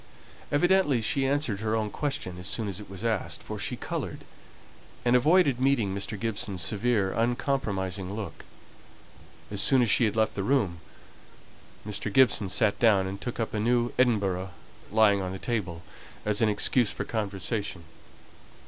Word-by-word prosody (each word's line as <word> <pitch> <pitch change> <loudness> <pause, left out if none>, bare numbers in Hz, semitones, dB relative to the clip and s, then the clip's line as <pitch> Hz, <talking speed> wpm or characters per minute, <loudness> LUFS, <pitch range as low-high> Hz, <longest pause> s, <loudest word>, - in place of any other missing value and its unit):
Evidently, 150 -3 +3
she 135 +4 0
answered 135 -7 0
her 110 +1 -1
own 110 -2 -1
question 95 -11 -3
as 90 - -5
soon 110 -3 -2
as 100 -1 -4
it 105 - -11
was 100 +3 -7
asked, 110 -3 -2
for - - -6
she - - -2
coloured, - - -5 0.8
and 120 +1 +4
avoided 145 0 +4
meeting 130 -7 +2
Mr. 100 +1 -3
Gibson's 100 -5 -2
severe, 100 +2 +1
uncompromising 105 -6 -1
look. 105 -6 -7 1.1
As 100 -1 +2
soon 130 +5 +5
as 115 - +2
she 120 - +4
had 105 -1 -1
left 110 0 +1
the 100 - -3
room, 100 -7 0 1.1
Mr. 105 0 -3
Gibson 110 -4 +4
sat 105 +1 +1
down, 105 -5 +4
and 95 +1 -6
took 120 - -5
up 115 - -2
a 105 - -1
new 120 +2 +1
Edinburgh 100 -7 +1 0.4
lying 105 -2 +4
on 95 0 -4
the - - -5
table, 95 -7 -3 0.4
as 105 0 +1
an 110 - +4
excuse 110 +2 +3
for - - -4
conversation. 100 -3 -3
110 Hz, 160 wpm, -27 LUFS, 100-120 Hz, 1.1 s, soon